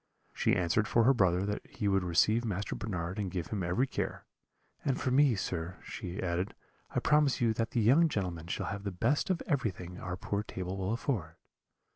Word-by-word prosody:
She - - +2
answered 90 +4 +2
for 115 - +4
her 135 +4 +6
brother 95 -5 +3
that 105 0 -3
he 105 - -3
would 95 -1 +3
receive 105 +7 +3
Master 100 -3 -2
Bernard 90 -2 -3
and 100 -3 -1
give 85 -3 -4
him 105 -3 -2
every 90 +9 +1
care; - - -4 0.6
'and 135 -2 0
for 130 - 0
me, 135 -2 +5
sir,' 90 -2 -3
she 90 +2 -6
added, 90 +2 -1 0.4
'I - - +2
promise 150 -2 +3
you 115 -2 +3
that 115 0 -1
the 120 - 0
young 145 +10 +5
gentleman 90 - -3
shall - - -2
have 100 - -4
the 100 - -1
best 140 - 0
of 185 -3 0
everything 95 - -2
our 90 0 -4
poor 100 +2 -2
table 95 -3 -5
will 95 +1 -2
afford.' 105 - -2
100 Hz, 200 wpm, -31 LUFS, 90-120 Hz, 0.6 s, her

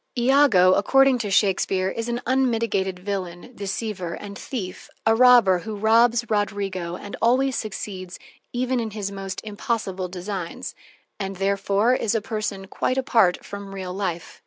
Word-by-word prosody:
Iago, 240 -8 +5
according 270 +5 +4
to 215 -3 -2
Shakespeare, 190 -1 +2
is 230 +3 -4
an 240 +1 -2
unmitigated 230 -7 +1
villain, 185 +1 -5
deceiver, 195 -4 -4
and 200 -1 -9
thief, 195 -6 -6 0.2
a 225 - +5
robber 235 -6 +6
who 215 +4 -6
robs 230 +3 +4
Roderigo 200 -4 -2
and 205 +3 -8
always 255 +3 +3
succeeds 190 -4 -5 0.3
even 250 +1 0
in 225 -2 -2
his 200 -1 -3
most 195 -1 -5
impossible 205 -3 -3
designs, 180 -1 -5 0.5
and 195 -1 -4
therefore 200 +4 +1
is 230 -3 0
a - - +3
person 215 -3 -4
quite 255 +6 -2
apart 225 -8 +2
from 200 -1 -8
real 185 -2 -5
life. 180 -4 -4
205 Hz, 145 wpm, -23 LUFS, 190-235 Hz, 0.5 s, robber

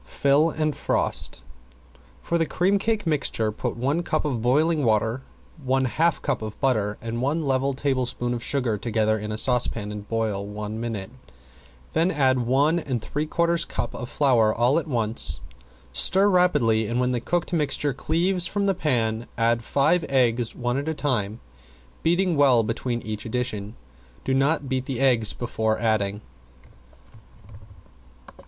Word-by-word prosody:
Fill 140 +3 +2
and 155 -2 -1
frost. - - -1 0.8
For 170 - 0
the 165 - +1
cream 195 +3 +1
cake 220 0 -1
mixture 140 -8 0
put 105 - -4
one 140 +7 0
cup 155 -3 -1
of 130 -6 -2
boiling 150 +6 +2
water, 110 +2 +1 0.4
one 130 0 +1
half 165 +7 0
cup 140 -7 -1
of 110 -1 -7
butter 110 -6 0
and 115 +1 -4
one 150 +5 0
level 135 0 0
tablespoon 130 -3 -1
of 120 -1 -4
sugar 125 -7 -1
together 110 -1 0
in 105 +1 -5
a 105 - -3
saucepan 115 -3 +2
and 105 0 -8
boil 110 -3 -1
one 105 +1 -6
minute, 115 -3 -4 0.8
then 165 +3 +2
add 130 -6 +2
one 140 +7 +2
and 130 -6 -3
three 150 +6 -3
quarters 170 +1 +1
cups 120 - -4
of 120 - -6
flour 125 -8 +3
all 120 +7 +2
at 165 - -7
once. 115 -5 +2 0.5
Stir 190 - +4
rapidly 145 - +2
and 120 +3 -1
when 125 0 +1
the 120 -2 -1
cooked 175 +6 -2
mixture 150 -3 0
cleaves 175 +6 +1
from 200 +1 -1
the 195 - +2
pan 120 -9 -1
add 115 0 +2
five 150 +8 +2
eggs 120 -3 +1
one 120 0 -2
at 145 - -5
a 160 - -2
time, 115 -7 -1 0.6
beating 175 +1 +1
well 135 -5 +4
between 120 +2 -3
each 110 -1 -5
addition. 110 -3 -3 0.5
Do 135 - -1
not 140 +2 +1
beat 130 0 -2
the 130 -3 -3
eggs 125 -6 +3
before 110 -2 -1
adding. 105 -3 0
125 Hz, 160 wpm, -24 LUFS, 115-150 Hz, 0.8 s, Stir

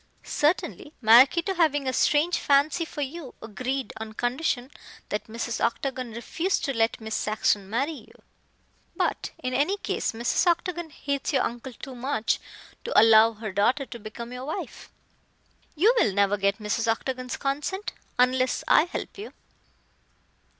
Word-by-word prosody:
Certainly, 310 +1 -1
Maraquito 260 - +6
having 300 -6 +2
a 260 - 0
strange 305 +7 +2
fancy 290 +4 +2
for 300 - -7
you, 285 0 -6
agreed, 250 +5 -4
on 220 0 -7
condition 245 +2 -1 0.4
that 210 - -3
Mrs. 230 +1 -3
Octagon 255 0 -2
refuse 325 - -1
to 275 - -1
let 225 0 +1
Miss 220 -1 -6
Saxon 210 -2 0
marry 270 +8 0 0.2
you. - - -21 0.7
But, - - -1
in 255 0 -2
any 295 +10 +1
case, - - -2
Mrs. 235 +9 0
Octagon 345 -1 0
hates 280 -1 -3
your 265 - +3
uncle 240 +2 -4
too 270 +2 -9
much 245 -2 -1 0.4
to - - +3
allow 225 0 +7
her 215 -1 -6
daughter 240 +9 +2
to 240 -2 -9
become 235 +3 -8
your 250 +1 -6
wife. 305 - -6 0.9
You 405 +10 +5
will 210 - +3
never 200 +1 +3
get 200 0 +1
Mrs. 220 +1 0
Octagon's 255 +2 -3
consent 295 +9 -2 0.3
unless 255 +1 +2
I 310 - +6
help 360 - -6
you." 415 - -8
255 Hz, 150 wpm, -26 LUFS, 225-295 Hz, 0.9 s, allow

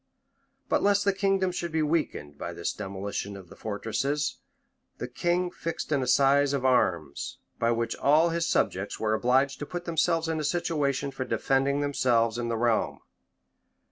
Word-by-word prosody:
[] - - -45
But - - +2
lest 205 0 +3
the 200 - +3
kingdom 195 -1 +1
should 175 -1 -4
be 160 -1 +1
weakened 150 - -1
by 85 +4 -6
this 85 0 -2
demolition 100 0 -5
of 95 -3 -13
the - - -12
fortresses, 135 +8 -2 0.6
the - - -4
king 175 +1 0
fixed 165 -1 -5
an 140 -3 +2
assize 135 +2 +4
of 135 -2 -1
arms, 85 - +1 0.2
by 115 - +2
which 115 0 0
all 155 +4 +4
his 165 0 0
subjects 95 +2 0
were 110 -1 +1
obliged 130 +4 +2
to 145 - -5
put 175 0 -5
themselves 165 0 +1
in 160 -1 -1
a - - -2
situation 145 -4 0
for 135 -1 -4
defending 135 +2 +1
themselves 120 -5 +1
and 120 -1 -2
the 115 - -1
realm. 115 -1 +1
140 Hz, 170 wpm, -27 LUFS, 115-165 Hz, 0.6 s, assize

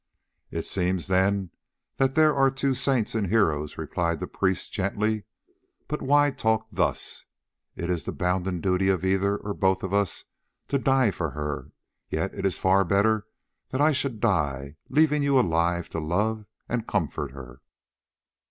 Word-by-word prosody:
"It - - -4
seems 90 -2 0
then 95 -1 +1 0.5
that 135 0 +2
there 155 -1 +5
are 135 -1 +4
two 135 0 0
saints 130 -3 +1
and 110 -3 0
heroes," 80 -9 +1
replied 85 -2 -1
the - - -3
priest 95 -1 -1
gently. 105 +2 -1 0.6
"But 150 - -3
why 145 +1 +4
talk 110 -3 0
thus? - - 0 0.5
It 85 - -4
is 90 -2 -1
the - - -2
bounden 90 -1 -1
duty 95 0 +2
of 95 -1 +1
either 95 +1 +2
or 100 0 -5
both 95 -1 +1
of 95 0 -3
us 100 -3 0 0.4
to 140 - +1
die 135 -4 +3
for 85 -3 -3
her, 75 +1 -5 0.4
yet - - -2
it 95 - -1
is 95 - -2
far 95 +1 +4
better 100 +3 +2 0.4
that 130 - -3
I 150 +2 +5
should 130 -5 -1
die 70 -7 0
leaving 150 +2 +3
you 140 -2 +4
alive 85 -3 +1
to 80 - -3
love 105 +7 -1 0.2
and 120 -1 -2
comfort 90 -8 -1
her." 65 -2 -11
100 Hz, 160 wpm, -26 LUFS, 90-120 Hz, 0.6 s, there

